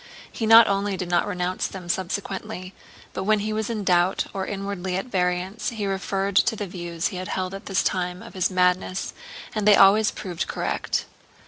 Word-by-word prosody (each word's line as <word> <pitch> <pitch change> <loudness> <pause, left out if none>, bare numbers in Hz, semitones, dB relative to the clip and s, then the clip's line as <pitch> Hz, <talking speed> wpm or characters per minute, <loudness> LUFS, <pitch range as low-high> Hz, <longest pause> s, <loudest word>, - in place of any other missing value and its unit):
He 225 - -3
not 225 0 +9
only 200 0 0
did 180 -2 -4
not 175 +3 +2
renounce 180 -2 -1
them 185 -2 -9
subsequently, 190 +1 -4 0.4
but - - -3
when 215 +2 +3
he 215 +1 -2
was 220 0 -2
in 220 -3 -2
doubt 180 0 +2
or 190 -1 -3
inwardly 195 -2 -3
at 190 - -3
variance, 185 -1 -1
he 220 -3 -4
referred 195 0 -2
to 225 - +4
the 205 - -4
views 175 -2 -3
he 190 - -6
had 185 0 -5
held 185 0 -3
at 195 +2 -8
this 195 -1 +1
time 180 +1 -2
of 230 - -11
his 185 -3 +1
madness 185 0 +1 0.4
and 210 -1 -1
they 210 - +8
always 205 +2 +6
proved 180 -4 -4
correct. - - -2
195 Hz, 195 wpm, -24 LUFS, 180-205 Hz, 0.4 s, not